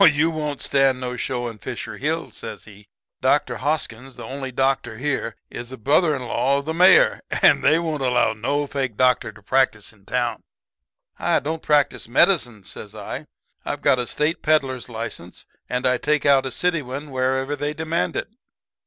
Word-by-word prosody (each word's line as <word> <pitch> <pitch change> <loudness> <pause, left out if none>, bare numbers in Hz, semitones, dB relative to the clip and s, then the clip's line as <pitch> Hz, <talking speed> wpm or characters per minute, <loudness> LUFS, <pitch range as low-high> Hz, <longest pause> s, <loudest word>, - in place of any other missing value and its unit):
"'Oh, - - +10
you 160 0 +4
won't 150 -3 -3
stand 135 -2 +2
no 125 -1 -4
show 125 0 -3
in 115 -2 -8
Fisher - - -6
Hill,' - - -2
says - - -8
he. 105 -1 -15 0.3
'Dr. - - +2
Hoskins, 135 -4 -3
the - - -9
only 135 0 -5
doctor 135 -3 0
here, 135 -4 -2 0.2
is 120 +1 -7
a 130 - -7
brother 150 +6 +3
in 130 - -5
law 125 +3 +1
of 140 - -4
the 160 - -2
Mayor, 180 +3 +6 0.2
and - - +6
they 155 - +5
won't 160 -4 -2
allow 125 -3 +2
no 140 +7 -1
fake 135 -6 -3
doctor 125 -3 +2
to 105 -1 -18
practice 120 -3 +1
in 100 -3 -25
town.' 120 0 -1 0.8
"'I - - +2
don't 160 +3 -3
practice 145 -5 +1
medicine,' 120 - +3
says 105 +3 -8
I, 105 -2 -6 0.4
'I've - - -4
got 130 - +4
a 120 - -2
State 150 +3 0
peddler's 135 -5 +1
license, 110 -6 -7 0.2
and 125 +1 -1
I 125 -1 +3
take 150 0 +1
out 135 -2 +4
a - - -5
city 170 +6 0
one 140 +3 -7
wherever 130 +2 0
they 145 +1 -3
demand 160 +2 -1
it.' - - -3
130 Hz, 190 wpm, -22 LUFS, 120-150 Hz, 0.8 s, Oh